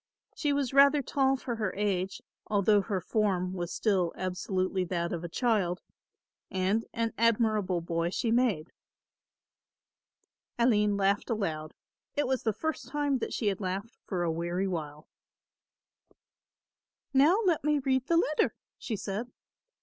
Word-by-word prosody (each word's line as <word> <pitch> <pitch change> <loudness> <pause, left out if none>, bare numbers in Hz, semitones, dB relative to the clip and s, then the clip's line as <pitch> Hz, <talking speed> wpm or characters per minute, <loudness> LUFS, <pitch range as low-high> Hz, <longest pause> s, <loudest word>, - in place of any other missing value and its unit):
She 295 - 0
was 280 -3 0
rather 280 +1 +6
tall 270 +1 +2
for 240 -2 -4
her 210 -4 -2
age, 195 -2 -1 0.2
although 205 0 +3
her 195 -1 -2
form 185 -1 0
was 175 -2 -4
still 185 -6 +1
absolutely 185 0 -1
that 170 0 -2
of 170 -1 -4
a 175 - -5
child, 195 -4 0 0.7
and 190 +4 0
an 230 0 -1
admirable 215 -6 +2
boy 165 0 -1
she 225 +5 -1
made. 230 -10 +1 1.9
Aline 210 -4 +3
laughed 200 +3 +1
aloud; 160 -9 -2 0.4
it 290 - +1
was 260 0 0
the 220 - +1
first 315 +2 -3
time 285 -1 0
that - - -3
she - - -2
had 200 -1 0
laughed 195 +5 -3
for 180 -3 -1
a 170 - +1
weary 175 +4 -1
while. 155 -4 -5 2.1
"Now 290 +8 +5
let 335 -6 +2
me 300 0 +2
read 260 -1 0
the 335 - +3
letter," 305 -2 +2 0.2
she 225 - -3
said. 210 +4 -4
205 Hz, 140 wpm, -29 LUFS, 185-250 Hz, 2.1 s, rather